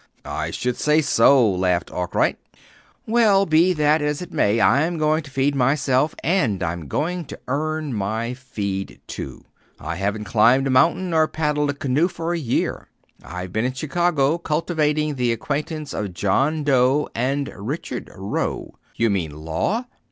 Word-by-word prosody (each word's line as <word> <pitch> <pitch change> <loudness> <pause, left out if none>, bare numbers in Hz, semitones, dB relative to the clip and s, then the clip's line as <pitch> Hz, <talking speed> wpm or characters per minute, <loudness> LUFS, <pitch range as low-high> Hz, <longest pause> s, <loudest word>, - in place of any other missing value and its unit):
"I - - -3
should 125 -1 -2
say 150 +1 +3
so," 135 -4 +5
laughed 90 -2 0
Arkwright. 90 -1 0 0.7
"Well, 215 -4 +4
be 165 +2 +4
that 150 -1 +2
as 150 0 -1
it 180 - -8
may. 105 +3 +2
I'm 155 +9 +3
going 155 +1 +2
to 150 - -12
feed 135 +1 +1
myself, 135 +1 +1
and 135 - +1
I'm 85 -2 -3
going 175 - -2
to - - -9
earn 155 +1 -2
my 110 +3 -2
feed, 100 -7 -5
too. 65 - -8 0.3
I 80 +4 -5
haven't 100 +3 -2
climbed 115 +6 +4
a 135 - 0
mountain 170 +7 +3
or 160 -1 +4
paddled 150 -2 0
a 145 - -1
canoe, 145 +3 +1
for 170 -1 -3
a 170 - -1
year. 125 -6 -2 0.4
I've 90 +1 -7
been 110 - 0
in 130 +1 -1
Chicago 155 +1 +1
cultivating 155 -2 0
the 125 -2 +1
acquaintance 150 +5 -3
of 100 -4 -4
John 140 - +1
Doe 135 +1 +3
and 135 +4 -1
Richard 125 - -5
Roe." 95 +2 -3 0.2
"You 115 -2 +2
mean 90 -5 -1 0.2
law?" 200 - -1
140 Hz, 160 wpm, -22 LUFS, 110-155 Hz, 0.7 s, so